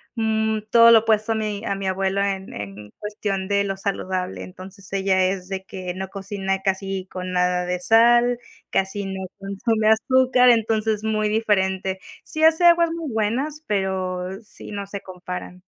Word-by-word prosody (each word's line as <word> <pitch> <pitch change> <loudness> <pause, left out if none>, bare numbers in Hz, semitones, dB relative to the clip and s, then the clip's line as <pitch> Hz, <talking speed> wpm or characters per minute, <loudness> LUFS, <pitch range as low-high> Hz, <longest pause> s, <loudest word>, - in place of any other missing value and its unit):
mm, 220 -1 0
todo 230 0 +8
lo 225 - +8
opuesto 220 0 +1
a - - -3
mi 210 -2 -3
a 200 - -1
mi 195 -1 -4
abuelo 190 +1 0
en 195 -1 -3
en 105 +1 -8
cuestión 205 -2 -3
de 200 0 +2
lo 195 -1 -3
saludable. 185 -2 -3
Entonces, 185 +1 -12
ella 190 -1 +2
es 185 -1 -2
de 190 -1 -4
que 185 -1 -6
no 190 0 -5
cocina 195 -1 -3
casi 195 -1 -2
con 185 0 -5
nada 180 0 +1
de 180 0 -2
sal, 240 +4 +4 0.3
casi 195 +1 -1
no 190 0 -5
consume 215 +3 0
azúcar, 250 +2 +4
entonces, 220 -2 +2
muy 215 -1 0
diferente. 190 -3 0 0.2
Sí 315 - -2
hace 320 +2 +5
aguas 340 -1 +5
muy 330 -5 -4
buenas, 255 +8 -1
pero 190 -1 -2
sí, 210 - -12
no 200 -1 -4
se 200 0 -6
comparan. 180 0 -8
200 Hz, 165 wpm, -22 LUFS, 190-220 Hz, 0.3 s, todo